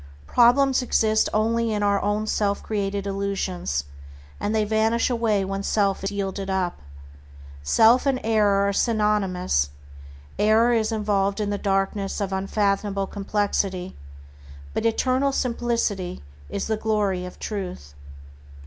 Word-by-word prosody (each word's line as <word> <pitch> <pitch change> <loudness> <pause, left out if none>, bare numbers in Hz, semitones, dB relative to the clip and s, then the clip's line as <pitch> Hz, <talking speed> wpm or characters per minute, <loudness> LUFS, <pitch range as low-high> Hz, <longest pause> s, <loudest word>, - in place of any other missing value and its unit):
Problems 255 - +4
exist 220 -3 +2
only 230 +1 +1
in 210 -1 -1
our 200 -1 +2
own 205 +1 0
self 205 -2 -1
created 200 -2 -2
illusions, 195 - -2 0.6
and 205 - -2
they 215 - +2
vanish 220 +3 +1
away 220 -5 +1
when 195 +1 -3
self 200 -1 0
is 195 - 0
yielded 195 -1 -4
up. 185 -2 -1 0.8
Self 225 - +4
and 265 -2 +1
error 205 -3 +3
are 200 - 0
synonymous. 195 - +1 0.7
Error 220 +3 +4
is 225 -1 +1
involved 205 -2 0
in 205 -1 -1
the 205 - -2
darkness 195 0 -1
of 195 -2 -2
unfathomable 200 0 0
complexity, 195 -2 -2 0.8
but - - 0
eternal 255 +4 +1
simplicity 230 - -1 0.3
is - - -3
the 220 -1 -1
glory 210 -4 0
of 180 - -8
Truth. 180 - -6
205 Hz, 130 wpm, -24 LUFS, 195-220 Hz, 0.8 s, Problems